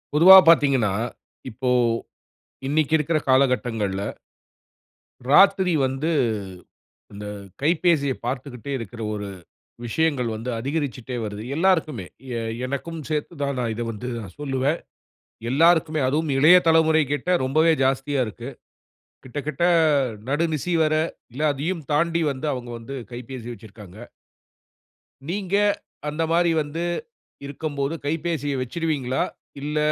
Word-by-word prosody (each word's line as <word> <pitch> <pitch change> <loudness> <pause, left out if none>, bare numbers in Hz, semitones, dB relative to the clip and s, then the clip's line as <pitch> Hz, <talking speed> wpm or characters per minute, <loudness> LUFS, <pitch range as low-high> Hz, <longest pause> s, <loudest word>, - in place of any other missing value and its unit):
பொதுவா 185 +5 +10
பாத்தீங்கன்னா, 135 -10 +4 0.6
இப்போ 125 +3 -3 1.0
இன்னிக்கிருக்குற 155 +2 +2
காலகட்டங்கள்ல, 120 -7 +2 1.3
ராத்திரி 190 +2 +5
வந்து 135 +5 -1 1.0
இந்த 105 +1 -8 0.4
கைபேசியப் 155 -3 +1
பார்த்துக்கிட்டே 130 0 -5
இருக்கிற 115 0 -8
ஒரு 105 -1 -4 0.6
விஷயங்கள் 135 -1 0
வந்து 115 +3 -5
அதிகரிச்சுட்டே 135 -2 -3
வருது. 105 0 -5
எல்லாருக்குமே, 160 - +1 0.3
எ - - -2 0.2
எனக்கும் 140 +5 -4
சேத்து 155 +2 -2
தான், 140 -1 -1
நான் 120 -2 -1
இத 115 - -5
வந்து 115 +3 -6
நான் 95 -5 -10
சொல்லுவேன். 140 +3 0 0.7
எல்லாருக்குமே, 160 +2 +3
அதுவும் 150 +2 0
இளைய 160 +6 +8
தலைமுறை 160 -1 +4
கிட்ட 145 +5 -2
ரொம்பவே 155 +5 +3
ஜாஸ்தியா 135 +1 +1
இருக்கு. 120 +4 -8 0.8
கிட்டதட்ட 145 +3 -5 0.7
நடுநிசி 160 +3 0
வர, 155 0 +2 0.6
அதையும் 160 +5 -2
தாண்டி 170 +2 +2
வந்து 135 +2 -4
அவுங்க 125 -2 -5
வந்து 115 +4 -8 0.2
கைபேசி 120 0 -8
வச்சிருக்காங்க. 105 -3 -13 1.3
நீங்க 195 0 -2 0.5
அந்த 155 +2 -2
மாரி 170 0 +3
வந்து 150 +3 -4 0.6
இருக்கம்போது 145 0 -3
கைப்பேசிய 155 -2 -1
வச்சிடுவீங்களா? 135 -1 -1 0.4
இல்ல, 150 +1 -2
140 Hz, 105 wpm, -23 LUFS, 125-160 Hz, 1.3 s, பொதுவா